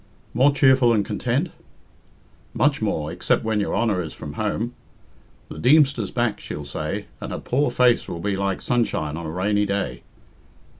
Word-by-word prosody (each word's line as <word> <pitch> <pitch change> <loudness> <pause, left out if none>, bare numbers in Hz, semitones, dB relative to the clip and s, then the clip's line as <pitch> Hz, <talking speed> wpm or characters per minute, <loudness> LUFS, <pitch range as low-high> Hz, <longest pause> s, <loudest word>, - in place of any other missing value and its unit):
"More 140 +3 +5
cheerful 130 -4 +4
and 105 -3 +1
content?" 125 - -1 1.1
"Much - - +2
more, - - -1
except - - 0
when 110 -1 0
your 100 - -1
Honour 105 -6 +1
is 80 -3 -7
from 75 - -8
home. 110 +6 -2 0.8
'The - - -8
Deemster's 135 -5 +4
back,' 120 -3 -1
she'll 75 - -6
say, 70 - -4 0.2
and - - -5
her - - -3
poor 140 +3 0
face 125 -1 +3
will 85 - -5
be 100 +3 -1
like 100 -1 -2
sunshine 95 -11 0
on 85 -1 -5
a - - -4
rainy 105 +4 +1
day." 100 0 -2
110 Hz, 165 wpm, -23 LUFS, 95-125 Hz, 1.1 s, More